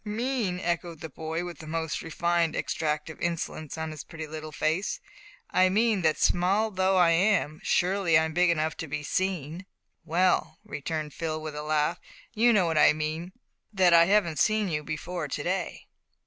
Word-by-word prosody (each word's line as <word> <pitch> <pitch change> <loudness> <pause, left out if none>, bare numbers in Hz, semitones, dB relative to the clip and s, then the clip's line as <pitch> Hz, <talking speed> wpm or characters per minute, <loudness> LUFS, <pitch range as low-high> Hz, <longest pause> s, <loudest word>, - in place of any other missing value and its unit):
"Mean!" 220 -3 -2
echoed 170 -2 -2
the 160 - -6
boy, 160 +4 -4
with 175 -3 -8
the 155 - -10
most 160 0 -2
refined 170 0 0
extract 150 -1 -2
of - - -14
insolence 165 -3 -3
on 160 0 -4
his 155 -3 -8
pretty 160 -1 -8
little 155 0 -7
face; 170 - -1 0.5
"I 185 0 +4
mean 215 0 +2
that 160 -2 +2
small 195 +5 +2
though 190 0 +2
I 175 -2 +5
am, 165 -3 +2
surely 180 -2 +2
I'm 160 0 +1
big 175 +1 +3
enough 160 -1 0
to 165 - -5
be 150 +1 -4
seen." 180 +1 -2 0.4
"Well," 170 -1 +1
returned 155 -5 -4
Phil, 155 -1 -3
with 155 -1 -6
a 150 - -4
laugh, 150 +2 0 0.3
"you 240 +2 +4
know 205 -5 +4
what 160 -2 +1
I - - +7
mean 155 +3 -4 0.4
that 185 -4 +4
I 170 0 +7
haven't 180 -6 +2
seen 215 -2 +2
you 150 -2 -2
before 155 +2 -4
to 145 +1 -4
day." 185 +3 -3
165 Hz, 180 wpm, -27 LUFS, 155-185 Hz, 0.5 s, I